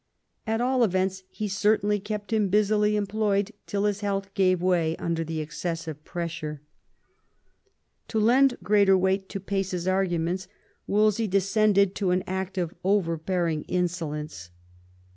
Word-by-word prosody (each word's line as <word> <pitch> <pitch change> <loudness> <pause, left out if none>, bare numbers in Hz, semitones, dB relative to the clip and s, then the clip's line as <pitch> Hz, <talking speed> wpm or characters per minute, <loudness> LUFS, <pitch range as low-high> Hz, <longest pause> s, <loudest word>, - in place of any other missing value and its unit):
At 225 +1 0
all 255 0 +2
events, 190 -2 0
he 210 +1 -4
certainly 205 +1 +2
kept 210 +2 -5
him 210 -3 +2
busily 210 +1 +3
employed 205 0 0 0.2
till 200 -1 -1
his 205 -1 0
health 195 -1 -2
gave 185 -2 +3
way 170 -3 +1
under 165 -1 -2
the 160 -1 -3
excessive 160 -1 -5
pressure. 165 -4 -5 1.4
To 220 - -1
lend 250 +4 +4
greater 200 0 +4
weight 190 +1 0
to 195 - -4
Pace's 190 -2 -2
arguments, 185 -1 0 0.4
Wolsey 215 +2 +2
descended 200 +1 +3
96 - - -9
THOMAS 200 - 0
WOLSEY 180 0 +3
chap. 185 - -10
to - - -6
an - - -1
act 190 +1 -4
of 175 -2 -1
overbearing 170 -3 0
insolence. 155 - -3
190 Hz, 145 wpm, -26 LUFS, 175-210 Hz, 1.4 s, lend